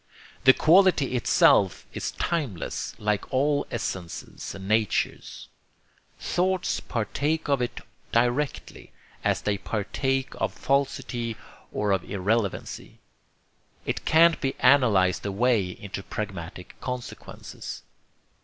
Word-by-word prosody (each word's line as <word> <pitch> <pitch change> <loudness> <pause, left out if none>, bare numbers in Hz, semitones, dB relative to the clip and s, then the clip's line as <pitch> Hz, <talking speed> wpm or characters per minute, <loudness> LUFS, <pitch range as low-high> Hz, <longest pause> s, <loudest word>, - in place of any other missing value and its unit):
The 130 - +9
quality 165 -6 +4
itself 100 -5 +4
is - - -3
timeless, 140 - -3
like 105 -1 -1
all 145 +2 +1
essences 95 -7 -5
and 95 0 -8
natures. 110 -2 0 0.7
Thoughts 185 0 0
partake 145 +8 -2
of 140 -3 +2
it 120 - -3 0.3
directly, 120 +4 -1 0.3
as - - +1
they 100 -1 0
partake 130 +6 -1
of - - -2
falsity 125 -4 -1 0.3
or 105 -1 0
of 95 -3 +1
irrelevancy. 100 +1 -2 0.9
It - - -2
can't 165 +1 +5
be 135 -1 -1
analyzed 115 -9 +4
away 105 0 +2
into 100 +2 -7
pragmatic 95 -5 -6
consequences." 125 -1 -7
120 Hz, 100 wpm, -26 LUFS, 100-140 Hz, 0.9 s, The